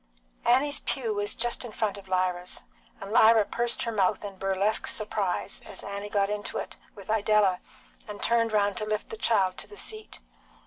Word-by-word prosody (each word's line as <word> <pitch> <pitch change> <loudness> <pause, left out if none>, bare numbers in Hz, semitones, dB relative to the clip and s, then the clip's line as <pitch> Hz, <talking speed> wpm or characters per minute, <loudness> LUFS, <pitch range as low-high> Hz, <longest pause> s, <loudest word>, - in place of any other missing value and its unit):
Annie's 285 +4 +3
pew 235 -6 -1
was 205 0 -1
just 240 +2 0
in 240 - -7
front 215 -1 -1
of 200 -1 -11
Lyra's, 185 -1 0 0.4
and 195 - -7
Lyra 220 -1 +6
pursed 235 +2 0
her 230 - -2
mouth 200 -1 +1
in 200 -1 -6
burlesque 195 +2 0
surprise 205 -3 -1
as - - -8
Annie 200 +1 -5
got 200 -1 +2
into 205 0 -3
it - - -5 0.2
with 200 -3 -12
Idella 210 -3 +3 0.5
and 205 -1 -7
turned 230 -1 +2
round 205 -2 +2
to 215 - -2
lift 215 0 -3
the - - -4
child 200 - +2
to - - -3
the 415 - -13
seat. 435 0 -4
210 Hz, 185 wpm, -28 LUFS, 200-230 Hz, 0.5 s, Lyra